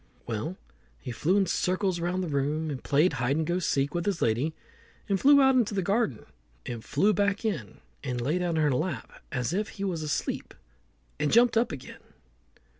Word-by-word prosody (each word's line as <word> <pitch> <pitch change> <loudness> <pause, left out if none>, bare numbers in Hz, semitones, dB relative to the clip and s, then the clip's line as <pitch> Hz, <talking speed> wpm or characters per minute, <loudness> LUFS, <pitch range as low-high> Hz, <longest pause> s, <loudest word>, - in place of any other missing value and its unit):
Well, - - -3 0.4
he 125 - -7
flew 170 +11 +1
in 200 - +3
circles 185 +1 0
round 180 +2 -1
the - - -3
room, 150 +2 -1
and 135 - -6
played 150 +6 +3
hide 125 +4 0
and 160 - 0
go 175 +3 0
seek 140 -5 0
with 175 +2 -2
his 195 -4 0
lady, 125 +8 +1 0.5
and 195 -2 +1
flew 280 +4 +7
out 265 -1 +6
into 235 -5 +2
the 195 - 0
garden, 195 - 0 0.4
and 120 -3 -5
flew 205 +11 +2
back 200 0 +1
again, 155 - -3 0.2
and 125 -1 -2
lay 150 +9 0
down 175 -2 0
in 155 - +3
her 150 - +3
lap 135 -2 -3
as 125 +1 -1
if 210 +3 -1
he 200 - -7
was 180 -5 -1
asleep, 150 -1 -3 0.6
and 150 - +1
jumped 240 +1 +5
up 230 +2 +2
again. 140 - -9
170 Hz, 195 wpm, -28 LUFS, 140-200 Hz, 0.6 s, flew